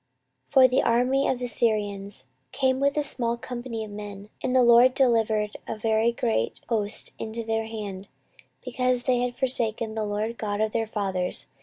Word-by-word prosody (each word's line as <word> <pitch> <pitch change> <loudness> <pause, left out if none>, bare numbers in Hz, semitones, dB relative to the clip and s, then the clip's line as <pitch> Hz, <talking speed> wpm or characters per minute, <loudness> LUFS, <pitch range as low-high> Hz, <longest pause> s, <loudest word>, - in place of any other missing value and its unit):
14:024:024 - - -28
For 265 -2 +8
the 255 +1 +2
army 250 +4 +2
of 260 - 0
the 250 - -4
Syrians 205 - 0 0.3
came 260 -1 +1
with 280 +1 +1
a 300 - +2
small 235 -4 +2
company 240 -2 -6
of 210 - -11
men, 205 0 -8
and 255 - -1
the 255 - +5
LORD 240 +2 +6
delivered 220 -5 +1
a - - -4
very 220 +1 +1
great 110 - -1
host 215 -2 +1
into 225 +1 -5
their 225 0 -1
hand, 205 -3 -7 0.6
because 250 0 0
they 250 -1 +1
had 245 0 -2
forsaken 230 -4 -1
the 220 -1 -2
LORD 210 +3 -3
God 205 -1 -2
of 220 0 0
their 225 0 -1
fathers. 190 -4 -2
225 Hz, 180 wpm, -25 LUFS, 210-250 Hz, 0.6 s, For